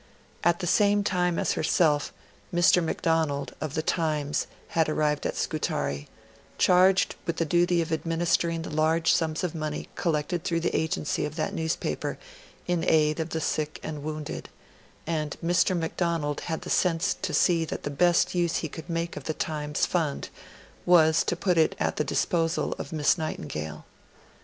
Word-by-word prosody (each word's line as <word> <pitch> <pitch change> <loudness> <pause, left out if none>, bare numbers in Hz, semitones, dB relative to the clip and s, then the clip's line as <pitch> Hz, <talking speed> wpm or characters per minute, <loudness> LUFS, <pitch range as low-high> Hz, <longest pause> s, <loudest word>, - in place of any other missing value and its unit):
At 175 +2 +2
the - - -2
same 205 +3 +3
time 180 -3 +1
as - - +1
herself, 155 -2 +2 0.4
Mr. 175 0 +4
Macdonald, 160 -3 0
of 155 -2 -4
The 155 - 0
Times, 155 -3 0 0.2
had 160 -1 +1
arrived 150 -1 0
at - - -4
Scutari, 70 0 -2 0.5
charged 185 +1 +4
with 170 - -1
the 165 - +1
duty 175 +1 +2
of 165 - -8
administering 165 +1 0
the - - -6
large 160 +2 +2
sums 160 0 0
of 180 - -1
money 155 -2 -4
collected 165 +1 -1
through 165 -1 0
the 170 - -1
agency 160 -1 -1
of 150 0 -4
that 155 -1 -2
newspaper 160 0 -2 0.5
in 175 -2 0
aid 155 0 +3
of 160 +1 -2
the 160 - -2
sick 155 -1 -2
and 150 -2 -5
wounded; 155 0 -5 0.6
and 155 -2 -2
Mr. 180 +1 +3
Macdonald 165 -3 -1
had 160 - -2
the 180 - -6
sense 170 -1 +2
to - - -2
see 170 -3 +3
that - - -5
the 145 - -3
best 175 +4 +3
use 175 -2 +1
he 160 - -1
could 160 +4 -9
make 170 0 -2
of - - -8
The 155 - -2
Times 150 -2 -1
Fund 160 -5 -1 0.5
was 160 -3 +5
to - - 0
put 175 -1 +1
it 160 +4 +3
at - - -1
the - - +2
disposal 165 -1 0
of - - -6
Miss 155 +1 +2
Nightingale. 75 - -5
160 Hz, 170 wpm, -27 LUFS, 155-175 Hz, 0.6 s, was